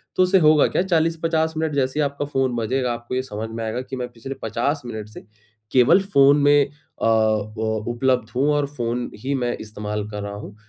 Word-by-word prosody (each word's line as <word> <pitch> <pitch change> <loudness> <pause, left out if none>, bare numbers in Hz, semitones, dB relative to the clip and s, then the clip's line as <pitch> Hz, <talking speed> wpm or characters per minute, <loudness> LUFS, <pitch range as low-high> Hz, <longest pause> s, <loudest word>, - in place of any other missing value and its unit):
तो 185 - +4
उससे 185 +1 +4
होगा 155 -2 +5
क्या - - 0
40-50 165 -2 +1
मिनट 160 -2 -1
जैसे 135 +2 0
ही - - +3
आपका 140 0 -2
फ़ोन 135 -3 -1
बजेगा 125 +2 -1
आपको 120 +1 -6
ये 130 - +1
समझ 110 -2 -6
में 115 0 -5
आएगा 110 +3 -2
कि, 130 +1 -7
मैं 125 -1 -3
पिछले 120 +3 -7
50 130 +7 -1
मिनट 110 -3 -6
से 105 - -12 0.5
केवल 130 +9 +5
फ़ोन 140 -7 +5
में 145 0 +5 0.4
अ, - - +1
उ 110 0 +1
उपलब्ध 125 -2 +1
हूँ 140 +3 +2
और 145 -1 +1
फ़ोन 120 -3 -3
ही 135 +6 -2
मैं 120 -2 -1
इस्तेमाल 105 -1 -5
कर 105 -1 -5
रहा 100 - -5
हूँ। 105 0 -9
130 Hz, 210 wpm, -22 LUFS, 110-145 Hz, 0.5 s, होगा